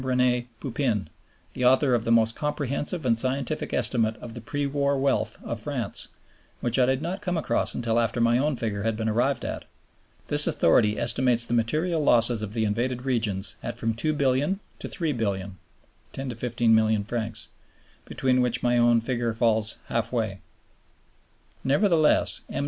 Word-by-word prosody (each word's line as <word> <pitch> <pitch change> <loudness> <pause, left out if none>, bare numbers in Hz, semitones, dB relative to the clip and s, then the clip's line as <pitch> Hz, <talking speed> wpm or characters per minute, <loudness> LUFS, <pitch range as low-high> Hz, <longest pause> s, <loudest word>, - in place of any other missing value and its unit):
RenÈ 125 -1 +1
Pupin, 120 - -2 0.4
the 125 - -4
author 130 +1 +4
of 115 -2 +1
the 115 - 0
most 115 -1 +3
comprehensive 150 +2 -3
and 115 -2 +3
scientific 135 +5 0
estimate 115 -2 +1
of 115 - -9
the 120 - -8
pre 145 +5 -3
war 140 0 0
wealth 135 0 0
of - - -4
France, - - -4 0.5
which 120 +2 0
I 125 - +4
did 130 +2 0
not 185 +4 -4
come 180 -3 -2
across 160 - 0
until 115 -1 0
after 115 +1 0
my 115 +1 +3
own 145 +1 +1
figure 110 -4 -3
had 115 +1 -1
been 110 0 -2
arrived 120 +6 0
at. - - -5 0.6
This - - +6
authority 105 +5 +3
estimates 120 0 +2
the 120 - -3
material 155 +9 0
losses 115 -3 +3
of 105 -1 -5
the 110 -1 +1
invaded 120 +4 -2
regions 105 -7 -1
at - - -5
from 115 0 -1
$2,000,000,000 140 - 0 0.2
to - - -6
$3,000,000,000 100 - -3 0.6
(10 135 -1 -5
to 120 - -5
15 120 0 +1
milliards), 110 0 0 0.6
between 130 -1 +1
which 120 -1 0
my 120 0 +3
own 120 -1 +4
figure 120 -1 -2
falls 110 -2 +1
half 115 -1 -2
way. 110 -6 -2 1.2
Nevertheless, 155 +2 +3
M. - - -4
120 Hz, 165 wpm, -25 LUFS, 115-135 Hz, 1.2 s, This